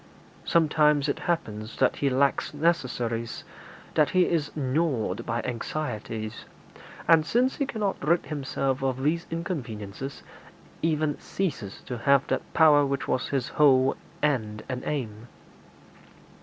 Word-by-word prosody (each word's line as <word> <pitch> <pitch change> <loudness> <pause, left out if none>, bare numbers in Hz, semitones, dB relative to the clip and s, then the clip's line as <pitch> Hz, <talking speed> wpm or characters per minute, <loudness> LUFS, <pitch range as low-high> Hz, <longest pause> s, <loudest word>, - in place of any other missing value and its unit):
Sometimes 150 -3 +3
it 140 - -1
happens 110 -10 -2
that - - +2
he 140 - +1
lacks 140 +2 +1
necessaries, 125 -8 -1 0.5
that 150 -2 +3
he 185 -1 +4
is 155 -3 0
gnawed 135 - -1
by 115 +1 -1
anxieties, 115 -4 -4 0.6
and, 165 -2 +6
since 245 +10 +1
he 280 - 0
cannot 210 - -2
rid 170 +4 +2
himself 135 -2 -2
of 130 -1 -1
these 165 +4 0
inconveniences, 135 - -5 0.6
even 155 -2 0
ceases 140 - -4
to 125 -3 -6
have 140 +2 +4
that - - -2
power 150 -3 +6
which 140 -1 -1
was 130 - 0
his 135 -3 -1
whole 135 -3 +4 0.3
end 110 -8 0
and 125 -1 -3
aim. 115 -6 -4
140 Hz, 130 wpm, -27 LUFS, 125-155 Hz, 0.6 s, and